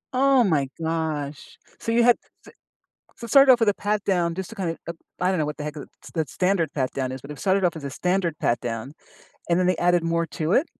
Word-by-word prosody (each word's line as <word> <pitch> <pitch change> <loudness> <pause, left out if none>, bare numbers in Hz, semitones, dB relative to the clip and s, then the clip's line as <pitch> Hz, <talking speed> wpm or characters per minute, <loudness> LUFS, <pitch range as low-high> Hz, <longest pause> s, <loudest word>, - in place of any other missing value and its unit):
Oh, 270 -1 +4
my 150 -9 +1
gosh. 155 -4 -3 0.2
So 230 - -3
you 235 +1 +4
had 245 -1 +5
s - - -38 0.8
so - - -7
it - - -11
started 275 +1 +8
off 245 - +3
with 225 - +3
a 205 - +4
pat 205 0 -1
down, 175 -4 +1
just 190 0 -5
to 225 - -11
kinda, 170 -4 -2
uh, 170 - -2 0.3
I 180 - +2
don't 185 - 0
know 155 - 0
what 150 - -4
the 150 - -6
heck 150 0 -5
the 145 -3 -8 0.2
st - - -14
the 160 -3 0
standard 180 -5 0
pat 130 -3 0
down 130 -1 -2
is, 130 - -6
but, 140 - -10
it 150 - -8
started 195 0 +1
off 170 -2 +1
as 145 - -8
a - - -3
standard 180 +1 -1
pat 120 -1 +1
down, 120 +3 -5 0.6
and 170 - +3
then 180 - +2
they 185 -2 +2
added 175 0 +2
more 165 0 0
to 155 +2 -2
it. 290 - +3
170 Hz, 265 wpm, -24 LUFS, 150-195 Hz, 0.8 s, started